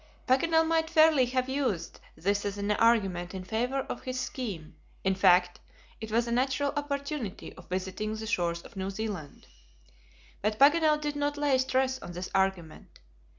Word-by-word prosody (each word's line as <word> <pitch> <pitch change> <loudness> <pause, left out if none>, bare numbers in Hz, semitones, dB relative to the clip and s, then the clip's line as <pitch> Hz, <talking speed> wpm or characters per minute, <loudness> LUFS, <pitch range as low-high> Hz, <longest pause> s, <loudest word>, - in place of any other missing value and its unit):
Paganel 320 +5 +3
might 320 0 +1
fairly 315 -5 +5
have 255 +1 -1
used 260 - -2 0.2
this 200 +5 0
as 205 0 -3
an 205 +1 -1
argument 195 -5 +2
in 185 - -5
favor 245 +8 -1
of - - -6
his 255 0 -4
scheme; 200 - -5 0.3
in 190 - +2
fact, 180 -1 +4 0.4
it 220 0 -7
was 230 +2 +2
a - - -3
natural 265 +3 +1
opportunity 280 -6 -4
of 180 - -15
visiting 190 +4 -3
the 220 0 -6
shores 170 -6 -1
of - - -14
New 190 0 -3
Zealand. 195 -7 -6 1.0
But 215 +1 0
Paganel 300 +2 +5
did 295 -1 -3
not 290 0 -1
lay 290 -2 +2
stress 260 0 +1
on 175 - -8
this 180 +1 -6
argument. 190 -4 -2
230 Hz, 165 wpm, -29 LUFS, 190-280 Hz, 1.0 s, fairly